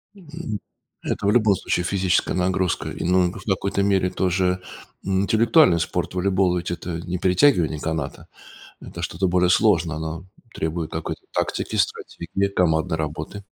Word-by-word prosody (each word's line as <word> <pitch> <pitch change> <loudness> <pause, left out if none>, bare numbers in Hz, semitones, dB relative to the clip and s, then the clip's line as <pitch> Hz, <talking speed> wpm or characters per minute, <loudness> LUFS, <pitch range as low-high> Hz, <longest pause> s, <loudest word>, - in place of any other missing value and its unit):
М. 160 - -6 0.4
Это 105 - -2
в 100 - +4
любом 110 -4 +4
случае 90 - -1
физическая 90 -1 +1
нагрузка, 90 -1 0
и, - - -5
ну 90 0 +3
в - - -10
какой-то 100 0 0
мере 95 -2 +2
тоже, 90 0 0 0.4
м, 95 -1 +1
интеллектуальный 110 - +4
спорт 80 - -2
волейбол 95 -1 +2
ведь 85 - -3
это 85 -1 -4
не 90 +1 -3
перетягивание 90 - +3
каната, 80 -3 -4 0.5
это 85 - -9
что-то 90 +2 -1
более 90 0 +2
сложное, 90 -6 +3
оно 80 +3 -5 0.3
требует 80 0 -3
какой-то - - -4
тактики, - - -2
стратегии, 100 0 -1
командной 80 -1 +1
работы. 80 +6 -5
90 Hz, 145 wpm, -23 LUFS, 85-100 Hz, 0.5 s, в